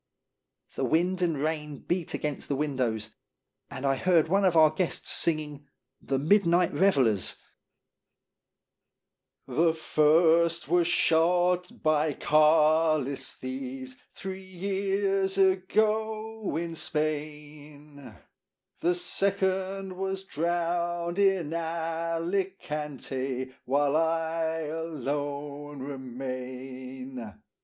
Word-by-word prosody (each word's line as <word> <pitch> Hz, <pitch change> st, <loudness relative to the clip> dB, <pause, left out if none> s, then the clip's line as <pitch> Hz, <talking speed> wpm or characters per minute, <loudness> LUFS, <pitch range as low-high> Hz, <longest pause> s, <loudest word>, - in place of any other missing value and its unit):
The -, -, -3 dB
wind 180 Hz, +3 st, +1 dB
and 165 Hz, -4 st, +1 dB
rain 150 Hz, 0 st, -2 dB
beat 175 Hz, +2 st, -2 dB
against 150 Hz, -2 st, -3 dB
the 140 Hz, -, -1 dB
win 145 Hz, -1 st, -2 dB
dows, 110 Hz, -3 st, -1 dB, 0.6 s
and 135 Hz, 0 st, -6 dB
I 135 Hz, -1 st, +2 dB
heard 165 Hz, 0 st, +3 dB
one 195 Hz, +2 st, +3 dB
of 175 Hz, -3 st, +3 dB
our 155 Hz, -1 st, +7 dB
guests 170 Hz, +2 st, -2 dB
singing 150 Hz, -3 st, -1 dB, 0.3 s
"The 135 Hz, -, -1 dB
Midnight 170 Hz, +3 st, +3 dB
Revellers:" 130 Hz, -, +2 dB, 1.1 s
" -, -, -58 dB
The 165 Hz, 0 st, +2 dB
first 165 Hz, +1 st, +3 dB
was 175 Hz, +1 st, +3 dB
shot 175 Hz, +2 st, +2 dB
by 155 Hz, -1 st, +2 dB
Carlist 155 Hz, -2 st, +3 dB
thieves 130 Hz, 0 st, -6 dB, 0.2 s
Three 190 Hz, 0 st, -6 dB
years 195 Hz, +1 st, -1 dB
ago 215 Hz, +3 st, +1 dB
in 170 Hz, 0 st, -3 dB
Spain; 150 Hz, -2 st, -5 dB, 0.6 s
The 175 Hz, +1 st, +2 dB
second 190 Hz, +1 st, -1 dB
was 190 Hz, 0 st, -3 dB
drowned 175 Hz, +1 st, -1 dB
in 190 Hz, -6 st, +2 dB
Alicante, 165 Hz, -5 st, -3 dB
While 140 Hz, +2 st, +2 dB
I 165 Hz, 0 st, 0 dB
alone 145 Hz, -2 st, -4 dB
remain. 130 Hz, -2 st, -7 dB
160 Hz, 95 wpm, -28 LUFS, 145-180 Hz, 1.1 s, our